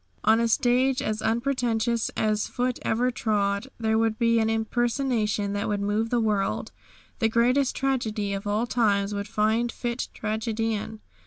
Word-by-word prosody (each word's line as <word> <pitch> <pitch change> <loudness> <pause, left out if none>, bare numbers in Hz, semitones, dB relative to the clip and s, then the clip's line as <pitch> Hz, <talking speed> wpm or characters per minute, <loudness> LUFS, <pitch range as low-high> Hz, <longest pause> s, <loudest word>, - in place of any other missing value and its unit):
On 220 +1 +4
a 235 - +2
stage 250 +3 +2
as 215 -3 -2
unpretentious 235 -1 0
as 215 -1 +1
foot 250 0 -2
ever 245 +3 +1
trod 205 -1 0
there 220 -1 +1
would 225 -1 +1
be 230 -1 +3
an 220 0 +1
impersonation 225 -2 0
that 205 0 -2
would 205 -1 0
move 210 +3 0
the 240 - +1
world. 210 -3 0 0.5
The 225 -2 +2
greatest 250 +4 +2
tragedy 220 -7 -1
of 195 +1 -4
all 210 +3 +1
times 210 -4 +1
would 200 0 -3
find 220 +2 +1
fit 240 +1 -3
tragedian. 220 0 -2
225 Hz, 155 wpm, -26 LUFS, 210-240 Hz, 0.5 s, On